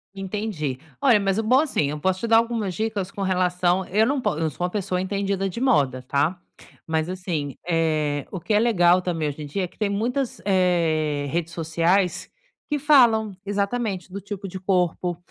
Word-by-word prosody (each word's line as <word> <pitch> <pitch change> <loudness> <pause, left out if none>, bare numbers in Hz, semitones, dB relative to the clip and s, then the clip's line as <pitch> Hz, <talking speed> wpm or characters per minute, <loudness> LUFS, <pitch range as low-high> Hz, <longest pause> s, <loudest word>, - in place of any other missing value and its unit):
Entendi. 195 -9 -3 0.2
Olha, 245 -7 +5
mas 195 +1 0
o - - 0
bom 255 +5 +4
assim, 155 - 0
eu 150 0 -4
posso 185 +3 0
te 230 - -3
dar 225 0 +6
algumas 230 -5 0
dicas 215 -4 -2
com 195 0 -5
relação. 180 0 +1
Eu 215 +4 +3
não 275 +1 0
po 205 -9 -1
eu 160 -1 0
sou 175 - -6
uma 180 - +1
pessoa 185 -2 -2
entendida 195 0 -1
de 210 - -6
moda, 140 - +2
tá. 155 +7 +1 0.5
Mas 160 +1 -1
assim, 165 -7 -3
eh, 155 -4 0
o 190 - -4
que 215 - -2
é 210 - +5
legal 185 -6 +4
também, 165 -4 -2
hoje 145 +2 -7
em 145 - -6
dia, 185 +6 -2
é - - -2
que - - -26
tem 210 -2 0
muitas, 240 +6 -1
eh, 165 -6 +1
redes 170 -1 -2
sociais 170 +3 0 0.4
que 295 - +1
falam 240 -7 +4
exatamente: 200 -2 -2
do 200 - -5
tipo 200 0 -6
de 190 0 -7
corpo, 180 -2 0
185 Hz, 195 wpm, -24 LUFS, 165-210 Hz, 0.5 s, dar